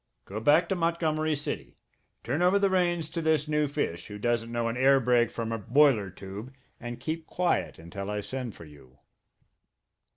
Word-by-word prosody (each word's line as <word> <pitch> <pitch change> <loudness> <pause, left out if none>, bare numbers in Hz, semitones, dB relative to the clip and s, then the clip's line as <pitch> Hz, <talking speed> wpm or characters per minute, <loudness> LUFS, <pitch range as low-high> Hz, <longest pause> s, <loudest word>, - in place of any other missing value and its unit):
Go 105 +3 -5
back 145 +9 +4
to 195 - +1
Montgomery 160 -2 0
City, 145 - -5 0.5
turn 155 - -1
over 180 +3 +5
the 200 -1 +2
reins 175 -3 +1
to 170 - -2
this 155 -2 +2
new 150 -1 +1
fish, 110 - -3
who 105 - -7
doesn't 115 +1 -1
know 120 -1 -1
an 115 - -2
air 135 +2 +5
brake 120 -1 +3
from 115 -1 -4
a 115 - -2
boiler 120 -2 +4
tube, 100 +6 -8 0.3
and 120 0 -6
keep 160 +5 -4
quiet 180 -1 0
until 95 +5 -7
I 105 0 -2
send 120 +1 -5
for 80 - -11
you." 70 -4 -17
130 Hz, 185 wpm, -28 LUFS, 105-155 Hz, 0.5 s, over